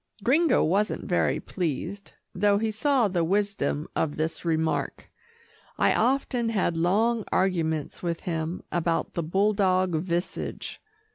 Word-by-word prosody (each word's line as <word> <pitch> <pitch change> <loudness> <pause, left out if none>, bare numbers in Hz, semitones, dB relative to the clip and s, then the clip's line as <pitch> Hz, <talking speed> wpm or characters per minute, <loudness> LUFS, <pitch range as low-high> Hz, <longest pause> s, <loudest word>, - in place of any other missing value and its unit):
Gringo 310 +8 +4
wasn't 200 +6 0
very 175 - +1
well - - -10
pleased, 180 +3 -4 0.2
though 200 +2 +3
he 220 +1 0
saw 250 +1 +2
the 180 -3 0
wisdom 190 -5 0
of 150 -2 -1
this 160 +1 -2
remark. 160 -1 -1 0.7
I - - +3
often 245 -1 +1
had 195 -6 0
long 215 +7 +2
arguments 160 -5 0
with 170 -2 -2
him 165 0 -3
about 170 -1 0
the 170 - -1
bulldog 185 +1 +2
visage. 175 +2 -3
185 Hz, 130 wpm, -26 LUFS, 165-210 Hz, 0.7 s, Gringo